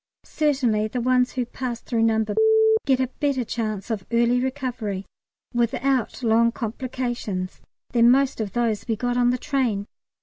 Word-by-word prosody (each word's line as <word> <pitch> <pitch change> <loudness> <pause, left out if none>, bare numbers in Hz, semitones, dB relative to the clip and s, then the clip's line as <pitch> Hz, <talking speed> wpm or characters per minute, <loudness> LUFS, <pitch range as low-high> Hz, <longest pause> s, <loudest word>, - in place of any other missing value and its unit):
Certainly 255 -8 +1
the 245 +3 -3
ones 250 +1 +2
who 250 -2 -1
pass 240 -1 -5
through 230 -1 -2
No. 220 -1 +2 0.6
get 265 -2 +3
a 260 -1 0
better 280 -4 +1
chance 215 -1 -3
of 210 -4 -2
early 235 +1 +3
recovery 250 -7 -3 0.5
without 245 +1 0
long 230 +1 +4
complications 235 -5 -4 0.3
than 235 -1 +5
most 270 -1 +3
of 205 -3 -4
those 230 -3 -1
we 225 - 0
got 245 +3 -1
on 245 0 +3
the 250 - +1
train. 250 -8 -1
240 Hz, 155 wpm, -24 LUFS, 220-255 Hz, 0.6 s, than